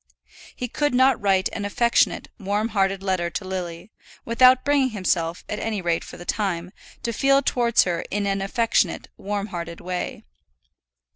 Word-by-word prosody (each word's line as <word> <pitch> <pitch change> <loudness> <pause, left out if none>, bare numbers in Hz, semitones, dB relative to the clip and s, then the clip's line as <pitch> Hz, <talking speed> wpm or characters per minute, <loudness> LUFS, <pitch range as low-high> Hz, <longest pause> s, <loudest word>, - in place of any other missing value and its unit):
He 250 - -4
could 290 +2 0
not 260 -1 +4
write 195 -2 +3
an 205 - -4
affectionate, 235 +4 +2
warm 205 +2 -1
hearted 195 -2 0
letter 185 -3 0
to 190 - -5
Lily, 180 0 -5 0.3
without 255 +2 +5
bringing 285 -2 +3
himself, 180 -5 -1
at 210 - -4
any 220 -2 -2
rate 170 -2 0
for - - -10
the 175 - -10
time, 180 -3 -2 0.3
to 235 - -2
feel 275 +4 +3
towards 240 -2 +3
her 175 -2 -2
in 205 0 -1
an 195 0 0
affectionate, 200 -3 0
warm 205 +1 -4
hearted 170 -1 -5
way. 180 0 -4
200 Hz, 160 wpm, -23 LUFS, 180-235 Hz, 0.3 s, without